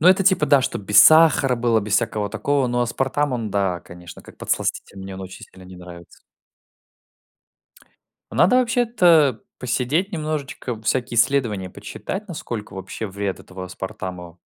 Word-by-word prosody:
Но 175 - +6
это 190 0 +4
типа 185 -6 +3
да, 140 -2 +4
чтоб - - -3
без 105 +1 +6
сахара 155 -5 +5
было, 115 -1 +2
без 100 0 -2
всякого 105 -3 -1
такого. 140 -2 0
Но 120 0 0
аспартам 135 +4 -1
он 115 -4 -3
да, 95 -3 -1
конечно, 90 0 -13
как - - -16
подсластитель, 100 - -3
мне 95 0 -8
он 95 - -8
очень 95 0 -10
сильно 95 0 -17
не 95 - -12
нравится. 85 -1 -13 2.1
Надо 225 +8 +4
вообще-то 185 - +3 0.2
посидеть 130 - -1
немножечко, 145 - -4
всякие 120 +1 -1
исследования 110 -8 +1
почитать, 195 - -7
насколько 120 -10 -6
вообще 95 +3 -6
вред 100 0 -4
этого 95 0 -9
аспартама 90 -2 -7
120 Hz, 150 wpm, -22 LUFS, 95-150 Hz, 2.1 s, Но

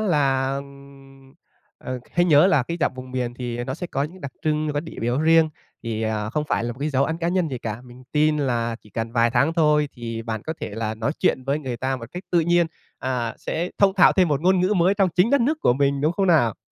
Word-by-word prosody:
là, 135 -8 +1
ừm, 140 -1 -13 0.4
ừ, 130 -1 -5
hãy 175 0 +3
nhớ 155 0 +6
là 170 -9 +3
cái 170 +6 -4
giọng 130 - +1
vùng 130 0 -9
miền 125 -1 -3
thì 120 -1 -4
nó 130 +1 -4
sẽ 175 +2 -5
có 140 - -2
những 170 +6 -6
đặc 140 -2 -7
trưng, 155 -1 0
có 145 - -1
điểm 165 -5 -9
yếu 120 +3 0
riêng 160 0 +5 0.3
thì, 115 -1 -3
à, 110 -1 -2
không 150 +4 -1
phải - - 0
là 120 - -2
một 125 - -15
cái 145 +2 -1
dấu 135 -1 +2
ấn 160 +2 -3
cá 170 0 -1
nhân 175 -2 +1
gì 130 -3 -4
cả. 110 0 -5
Mình 125 +1 -14
tin 150 0 +3
là 120 -4 -1
chỉ 105 - -20
cần 115 +3 -4
vài 115 -1 +3
tháng 130 +7 +2
thôi 150 -3 +3
thì 115 -2 -6
bạn 110 -2 -4
có 160 - -4
thể - - -3
là 110 -1 -2
nói 115 +6 -2
chuyện 130 - +1
với 140 +2 0
người 130 -5 -5
ta 130 +2 -2
một 115 -2 -8
cách 180 +2 -6
tự 175 - +5
nhiên, 175 +1 +3 0.3
à, 125 -3 -2
sẽ 175 +2 -3
thông 195 -1 +4
thạo 190 - +6
thêm 185 -3 +3
một 145 -2 0
ngôn 185 +2 +3
ngữ 190 +3 +2
mới 185 +2 +3
trong 195 -2 +2
chính 180 +7 +2
đất 280 -1 +4
nước 305 +6 +1
của - - +4
mình, 140 +1 +1
đúng 155 +4 +2
không 195 +2 0
nào? 145 - +3
140 Hz, 265 wpm, -23 LUFS, 120-165 Hz, 0.4 s, nhớ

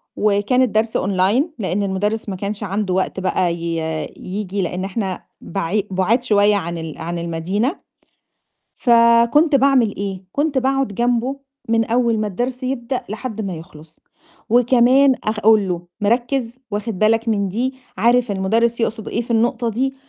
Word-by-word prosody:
وكان 210 +5 +2
الدرس 220 -2 +1
online، 195 +7 +2 0.2
لإن 195 +1 -1
المدرّس 205 +3 -2
ما 190 - -3
كانش 205 +2 -4
عنده 195 -1 -2
وقت 190 0 -1
بقى 185 -2 0
ي 170 0 -3 0.4
ييجي، 195 +1 -4
لإن 180 +1 -3
إحنا 195 -2 -4 0.2
بعي 195 +3 -2
بُعاد 205 +7 +1
شوية 205 -3 +3
عن 170 -3 -3
ال 160 -2 -6
عن 170 +1 -4
المدينة، 180 - -2 0.9
فكنت 235 +6 +4
باعمل 265 -5 +3
إيه، 195 -1 -5
كنت 290 -1 0
باقعُد 270 +1 +1
جنبه 245 +3 0 0.3
من 225 -1 +2
أول 235 -1 +1
ما 215 - -1
الدرس 250 +6 -3
يبدأ 255 0 -2
لحد 220 0 -5
ما 190 -4 -4
يخلص، 160 -1 -13 0.5
وكمان 250 +3 +5
أقول 215 -1 +3
له 175 -1 -4
"مركّز، 240 +2 0
واخِد 210 -1 -3
بالك 225 +2 +2
من 200 -3 +1
دي، 250 +7 -1 0.2
عارف 240 +1 +3
المدرّس 225 +5 +1
يقصد 225 -1 -2
إيه، 235 - -1
في 235 - -6
النقطة 235 +1 +1
دي؟" 265 +4 -1
215 Hz, 150 wpm, -20 LUFS, 190-240 Hz, 0.9 s, وكمان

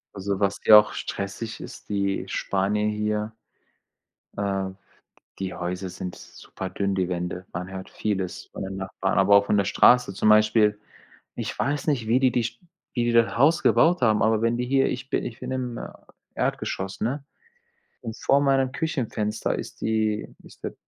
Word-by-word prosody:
Also, 100 0 -2
was 100 -1 0
hier 105 - +10
auch 105 - -1
stressig 100 +3 -5
ist - - -10
die 100 -1 -1
Spanier 100 +2 0
hier 105 0 -1 1.0
äh, 95 -1 -1 0.7
die 95 -2 -3
Häuser 90 +1 -4
sind 90 0 -6
super 95 -1 -9
dünn, 100 -1 -1
die 95 -2 0
Wände. 90 +1 -3
Man 90 +2 -5
hört 95 0 -7
vieles 95 -4 -3
von - - -8
den 95 0 -5
Nachbarn, 95 0 -1
aber 100 +1 +6
auch 100 - +2
von 105 - +2
der 100 - +2
Straße. 125 0 +5
Zum 105 +2 +2
Beispiel, 105 0 +4 0.6
ich - - -4
weiß 145 +3 -1
nicht, 125 -7 +1
wie 120 +4 +3
die 130 -1 +4
die 120 - +1
St 120 +1 -5 0.3
wie 120 -2 +1
die 120 - +1
das 115 -1 +3
Haus 145 +7 +4
gebaut 170 -2 +4
haben, 110 -2 +3
aber 110 0 +2
wenn 115 +1 +2
die 125 - -1
hier 135 +1 +3
ich 130 +2 -5
bi - - +1
ich 115 - -6
bin - - -5
im, 125 -2 -3
äh, - - -6 0.5
Erdgeschoss, 95 0 -2
ne, 135 +6 -2 0.8
und 115 -2 -6
vor 140 +1 +3
meinem 135 -2 +2
Küchenfenster 115 -9 -2
ist - - -8
die 110 -1 0 0.2
ist - - -17
der - - -4
105 Hz, 180 wpm, -25 LUFS, 95-120 Hz, 1.0 s, hier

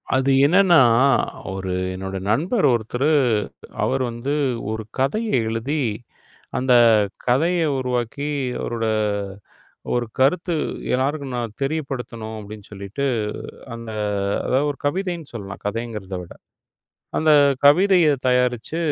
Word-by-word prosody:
அது 135 +1 +2
என்னன்னா 175 0 +5 0.7
ஒரு 95 -1 -4 0.2
என்னோட 95 +1 -5
நண்பர் 175 - +1
ஒருத்தரு, 125 +5 0 0.7
அவர் 135 0 0
வந்து 120 +5 -3 0.4
ஒரு 110 0 -4 0.2
கதைய 215 +13 0 0.2
எழுதி 120 +7 -2 0.8
அந்தக் 120 -5 +5 0.2
கதைய 165 +8 +2 0.2
உருவாக்கி, 125 +2 -2 0.3
அவரோட 115 -1 -2 1.1
ஒரு 120 -1 0
கருத்து 170 +6 +2 0.4
எல்லாருக்கும் 135 0 -1
நான் 115 -3 -4
தெரியப்படுத்தணும் 130 -7 -4
அப்படின்னு 105 0 -10
சொல்லிட்டு 100 +7 -5 0.7
அந்த 115 -1 -8 0.6
அதாவது 135 +3 +1
ஒரு 145 - -6
கவிதைன்னு 175 -1 -2
சொல்லலாம் 100 -3 -7
கதைங்கிறத 105 -3 -4
விட. 85 - -11 0.9
அந்தக் 145 -4 +4
கவிதைய 180 +2 +5 0.2
தயாரிச்சு 125 +4 +1
130 Hz, 100 wpm, -22 LUFS, 115-150 Hz, 1.1 s, என்னன்னா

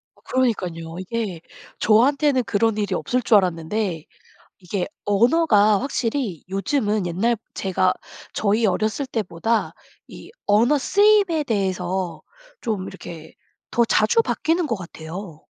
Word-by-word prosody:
어 - - -25
그러니깐요. 180 -10 -1
이게 190 -3 -4 0.4
저한테는 260 +4 +3
그런 220 +1 +1
일이 210 -1 -1
없을 250 +1 -1
줄 225 -1 +5
알았는데 180 -1 -2 0.5
이게 180 0 -3 0.2
언어가 215 -2 +4
확실히 235 - -2
요즘은 205 0 0
옛날 215 +8 +1 0.2
제가 185 -1 +1 0.4
저희 215 +2 +1
어렸을 215 +8 0
때보다 220 -1 -1 0.3
이 - - -12 0.2
언어 235 +8 +4
쓰임에 405 -1 +3
대해서 190 -4 -2 0.4
좀 210 -6 -2
이렇게 165 -4 -10 0.4
더 235 - +3
자주 225 - +3
바뀌는 335 -4 0
것 230 -6 -1
같아요. 165 -1 -9
210 Hz, 265 characters per minute, -22 LUFS, 185-240 Hz, 0.5 s, 줄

